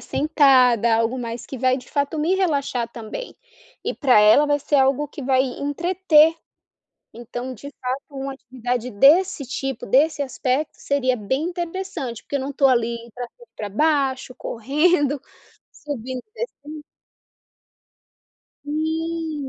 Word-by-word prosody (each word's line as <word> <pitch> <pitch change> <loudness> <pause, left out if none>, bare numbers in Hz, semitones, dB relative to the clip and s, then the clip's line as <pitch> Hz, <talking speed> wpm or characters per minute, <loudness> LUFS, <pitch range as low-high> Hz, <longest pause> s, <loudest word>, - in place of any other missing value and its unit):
sentada, 255 -7 +4
algo 230 +3 0
mais 235 -1 -5
que 265 - -7
vai 255 +1 +2
de 255 - -10
fato 285 +2 -1
me 330 +5 +2
relaxar 280 -10 0
também. 235 - -8 0.5
E - - -2
pra 255 -7 +4
ela 220 +8 +6
vai 290 0 +2
ser 290 - -3
algo 270 +2 +3
que 290 - -9
vai 260 0 +3
entreter. 315 +4 +2 0.8
Então, 245 +2 -6
de 280 +6 -10
fato, 255 +2 -2
uma 270 -1 -5
atividade 250 -1 -4
desse 285 - +4
tipo, 270 -1 -4
desse 290 +6 +3
aspecto, 270 +2 -1
seria 260 -3 0
bem 265 +7 -2
interessante, 345 - -4
porque - - -9
eu 275 - -2
não 275 +2 -4
tô 275 0 +3
ali 235 -2 +2 0.2
pra 245 - -5
cima 480 - -20
e - - -64
pra 210 - -4
baixo, 270 +1 0
correndo, 290 +4 +1 0.5
subindo 260 -3 -6
e 430 - -47
descendo 310 -11 -7 1.8
Sim. 315 -1 -3
275 Hz, 140 wpm, -22 LUFS, 250-305 Hz, 1.8 s, ela